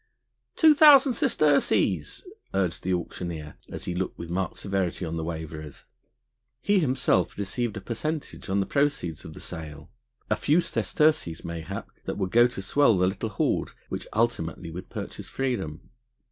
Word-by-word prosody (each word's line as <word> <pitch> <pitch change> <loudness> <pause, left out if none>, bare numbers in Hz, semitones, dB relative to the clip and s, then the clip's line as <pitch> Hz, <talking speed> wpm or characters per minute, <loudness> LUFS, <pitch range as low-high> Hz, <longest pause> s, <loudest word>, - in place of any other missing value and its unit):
"Two 315 -2 +7
thousand 285 -3 +8
sesterces!" 155 - +2 0.3
urged 90 -3 0
the 95 - -2
auctioneer, 85 -3 -4
as - - -6
he 90 - -2
looked 90 +1 -3
with 85 0 -7
marked 90 -1 -2
severity 95 -2 -1
on 80 0 -4
the 80 - -2
waverers. 80 -2 -6 0.8
He 205 +7 +3
himself 135 -6 +1
received 105 +2 -2
a - - -5
percentage 145 +3 -4
on 100 +1 +2
the - - 0
proceeds 140 - 0
of 80 - -8
the - - -9
sale, 75 -2 -8 0.4
a - - +2
few 155 +4 +3
sesterces 155 - +1
mayhap 85 -2 -6
that - - -3
would 95 -2 -2
go 120 +1 +6
to 110 -6 -6
swell 140 -3 +4
the 90 - +3
little 95 +4 -1
hoard 100 - 0 0.2
which - - -5
ultimately 90 -7 -1
would 90 +3 -8
purchase - - -7
freedom. 105 - -3
95 Hz, 160 wpm, -26 LUFS, 85-135 Hz, 0.8 s, thousand